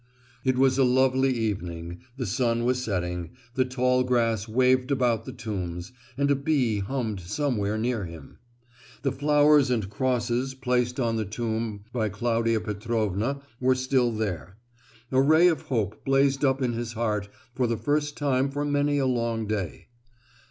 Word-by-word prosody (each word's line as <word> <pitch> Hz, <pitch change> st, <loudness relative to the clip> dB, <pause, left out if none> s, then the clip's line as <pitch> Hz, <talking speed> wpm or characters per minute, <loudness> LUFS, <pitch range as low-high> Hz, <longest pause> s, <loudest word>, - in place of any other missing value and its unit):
It 130 Hz, -1 st, +1 dB
was 130 Hz, 0 st, +3 dB
a -, -, +6 dB
lovely 130 Hz, +1 st, +3 dB
evening, 90 Hz, -7 st, -3 dB, 0.2 s
the 125 Hz, -, -2 dB
sun 115 Hz, +2 st, 0 dB
was 125 Hz, 0 st, +1 dB
setting, 90 Hz, -5 st, -3 dB, 0.2 s
the 130 Hz, 0 st, +2 dB
tall 125 Hz, 0 st, +1 dB
grass 115 Hz, -4 st, +1 dB
waved 130 Hz, +3 st, +2 dB
about 120 Hz, -5 st, +1 dB
the -, -, -6 dB
tombs, 95 Hz, -6 st, -5 dB, 0.3 s
and 140 Hz, 0 st, +2 dB
a -, -, +4 dB
bee 135 Hz, -7 st, +1 dB
hummed 110 Hz, -1 st, -2 dB
somewhere 105 Hz, -, -1 dB
near 115 Hz, -2 st, -1 dB
him. 85 Hz, -4 st, -11 dB, 0.6 s
The 135 Hz, -, +1 dB
flowers 145 Hz, 0 st, +4 dB
and 110 Hz, -6 st, -1 dB
crosses 125 Hz, +2 st, -1 dB
placed 125 Hz, -1 st, 0 dB
on 115 Hz, -3 st, +1 dB
the 110 Hz, -, -1 dB
tomb 110 Hz, 0 st, -3 dB
by 110 Hz, -4 st, 0 dB
Claudia 115 Hz, +2 st, 0 dB
Petrovna 110 Hz, +3 st, -2 dB, 0.2 s
were 130 Hz, 0 st, +3 dB
still 130 Hz, -1 st, +1 dB
there. 100 Hz, -4 st, -4 dB, 0.5 s
A 130 Hz, 0 st, +4 dB
ray 155 Hz, +5 st, +6 dB
of 165 Hz, -4 st, +1 dB
hope 110 Hz, -5 st, -2 dB
blazed 135 Hz, +1 st, +2 dB
up 135 Hz, -1 st, +2 dB
in 120 Hz, -2 st, 0 dB
his 115 Hz, 0 st, -4 dB
heart 105 Hz, -3 st, -1 dB, 0.2 s
for 125 Hz, 0 st, 0 dB
the 115 Hz, -1 st, -1 dB
first 145 Hz, +1 st, -1 dB
time 135 Hz, -2 st, +1 dB
for 145 Hz, +1 st, -2 dB
many 145 Hz, 0 st, +1 dB
a 135 Hz, -, +1 dB
long 115 Hz, -3 st, 0 dB
day. 100 Hz, -7 st, -4 dB
120 Hz, 160 wpm, -26 LUFS, 110-130 Hz, 0.6 s, a